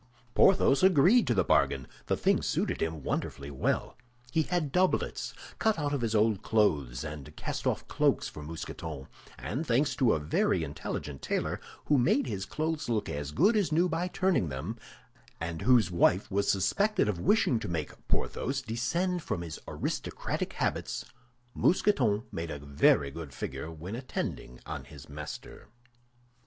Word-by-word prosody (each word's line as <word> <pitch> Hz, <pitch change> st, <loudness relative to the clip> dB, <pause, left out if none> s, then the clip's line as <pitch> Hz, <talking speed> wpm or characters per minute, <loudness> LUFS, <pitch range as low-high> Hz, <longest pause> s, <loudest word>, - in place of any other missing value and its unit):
Porthos 180 Hz, -7 st, +5 dB
agreed 190 Hz, -, +5 dB
to 120 Hz, -, +2 dB
the 95 Hz, -, +3 dB
bargain; 65 Hz, -5 st, +2 dB, 0.2 s
the -, -, +1 dB
thing -, -, +2 dB
suited -, -, -1 dB
him 80 Hz, -3 st, -2 dB
wonderfully 70 Hz, +2 st, -3 dB
well. 65 Hz, -, -1 dB, 0.4 s
He 160 Hz, -, +3 dB
had 160 Hz, -3 st, -1 dB
doublets 185 Hz, +4 st, +1 dB, 0.2 s
cut 220 Hz, -4 st, +2 dB
out 145 Hz, -2 st, -1 dB
of 140 Hz, -, -1 dB
his 115 Hz, -1 st, 0 dB
old 105 Hz, -2 st, +3 dB
clothes 70 Hz, -, +1 dB
and 75 Hz, -3 st, -7 dB
cast -, -, -3 dB
off -, -, -1 dB
cloaks -, -, +2 dB
for 75 Hz, -, -9 dB
Mousqueton, 75 Hz, -2 st, -6 dB, 0.3 s
and 140 Hz, -, -3 dB
thanks 130 Hz, +5 st, +2 dB
to 130 Hz, -5 st, +4 dB
a -, -, +1 dB
very 75 Hz, +2 st, +1 dB
intelligent 75 Hz, -2 st, -5 dB
tailor, -, -, -2 dB, 0.2 s
who 145 Hz, -2 st, +4 dB
made 125 Hz, +3 st, +3 dB
his 100 Hz, -5 st, -4 dB
clothes 155 Hz, -2 st, -2 dB
look 110 Hz, -3 st, 0 dB
as 70 Hz, 0 st, -4 dB
good 200 Hz, -, +4 dB
as 205 Hz, -6 st, +2 dB
new 170 Hz, +4 st, +3 dB
by 170 Hz, +1 st, -1 dB
turning 185 Hz, -, +1 dB
them, 75 Hz, +12 st, -4 dB, 0.6 s
and 80 Hz, 0 st, -4 dB
whose 120 Hz, -8 st, +4 dB
wife 90 Hz, +4 st, +3 dB
was 100 Hz, +1 st, +1 dB
suspected 200 Hz, -, +2 dB
of 100 Hz, -5 st, -1 dB
wishing 140 Hz, -, +3 dB
to -, -, -5 dB
make 80 Hz, -4 st, -5 dB
Porthos 135 Hz, +2 st, -1 dB
descend 170 Hz, +11 st, -1 dB
from 85 Hz, -, -3 dB
his 80 Hz, -3 st, -6 dB
aristocratic -, -, -3 dB
habits, -, -, -2 dB, 0.5 s
Mousqueton 125 Hz, -, +2 dB
made 85 Hz, 0 st, -4 dB
a 75 Hz, -, -4 dB
very 70 Hz, 0 st, +3 dB
good 80 Hz, -3 st, -8 dB
figure 80 Hz, -, -5 dB
when 80 Hz, +6 st, -6 dB
attending 115 Hz, -, -5 dB
on -, -, -6 dB
his 70 Hz, -3 st, -12 dB
master. 75 Hz, +1 st, -8 dB
105 Hz, 160 wpm, -30 LUFS, -, 0.6 s, Porthos